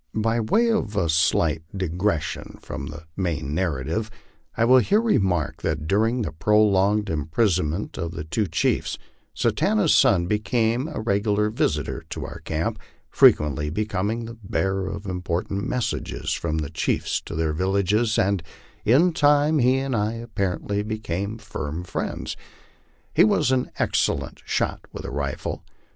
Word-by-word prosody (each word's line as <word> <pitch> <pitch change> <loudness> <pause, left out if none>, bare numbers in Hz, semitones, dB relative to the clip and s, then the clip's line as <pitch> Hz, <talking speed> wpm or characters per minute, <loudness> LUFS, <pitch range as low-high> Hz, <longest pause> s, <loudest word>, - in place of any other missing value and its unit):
By 115 +2 +1
way 225 - +2
of 110 - -1
a 90 -5 +1
slight 80 0 +2 0.2
digression 90 -2 -2
from 70 - -6
the 75 +2 -8
main 80 -7 -2
narrative, 85 +5 -1 0.5
I 115 - +3
will 130 +2 +7
here 205 - +3
remark 95 - +1
that 75 -1 -2
during 110 +6 +2
the 100 - -3
prolonged 105 +3 +3
imprisonment 80 +2 0
of 85 - -2
the 75 - -5
two 100 +7 -1
chiefs, - - 0 0.4
Satanta's 205 -5 +2
son 90 -4 +4
became 115 - 0
a 155 - -5
regular 105 0 +1
visitor 75 - -1
to - - -5
our - - -8
camp, - - -2 0.3
frequently 75 0 +4
becoming 105 +5 -2
the 115 - -7
bearer 95 0 -1
of 100 +1 -5
important 95 +3 -2
messages 125 -3 -2
from 80 -2 -2
the 75 -1 -3
chiefs 80 - -1
to - - -6
their 80 -1 0
villages, 100 +6 +1
and 100 -1 +2 0.4
in 160 +10 +4
time 145 +1 +4
he 130 +1 +4
and 135 -1 -1
I, 105 +1 0
apparently, 105 -3 -2
became 105 -1 -3
firm 90 -7 -5
friends. 90 - -4 0.8
He 170 - +6
was 200 - +3
an 130 -1 +1
excellent - - 0
shot - - -1
with - - -7
the - - -5
rifle. 70 -2 -3
100 Hz, 145 wpm, -24 LUFS, 85-115 Hz, 0.8 s, will